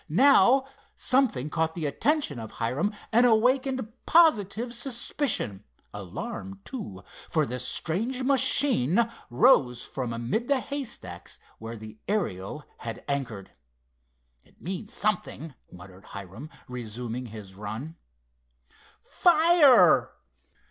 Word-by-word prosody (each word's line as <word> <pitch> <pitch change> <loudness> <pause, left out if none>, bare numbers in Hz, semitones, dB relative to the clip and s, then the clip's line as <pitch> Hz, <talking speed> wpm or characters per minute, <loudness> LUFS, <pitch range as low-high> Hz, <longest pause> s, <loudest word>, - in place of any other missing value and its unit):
Now 265 - +5 0.3
something 235 - +1
caught 160 -1 -1
the 165 -3 -3
attention 275 - 0
of 110 -1 -8
Hiram 130 - -1 0.2
and 235 +2 +5
awakened 255 +2 +2 0.2
positive 235 - +3
suspicion; 235 - -1 0.3
alarm, 195 - -7
too, 105 - -7 0.3
for 155 -3 +1
the 125 -1 -4
strange 220 - -1
machine 250 - +3 0.2
arose 125 0 +4
from 125 -3 -5
amid 120 - -2
the 280 -2 +2
haystacks 250 - -6 0.2
where 115 +1 -7
the 110 0 -11
Ariel 150 - -3
had 115 -2 -7
anchored. 125 -9 -4 0.9
"It - - -28
means 190 +4 -5
something," 180 -7 -2 0.2
muttered 90 +2 -14
Hiram, 100 - -9 0.2
resuming 120 0 -6
his 105 -3 -10
run. 110 +11 -7 1.1
"Fire!" 315 - +5
160 Hz, 105 wpm, -27 LUFS, -, 1.1 s, Now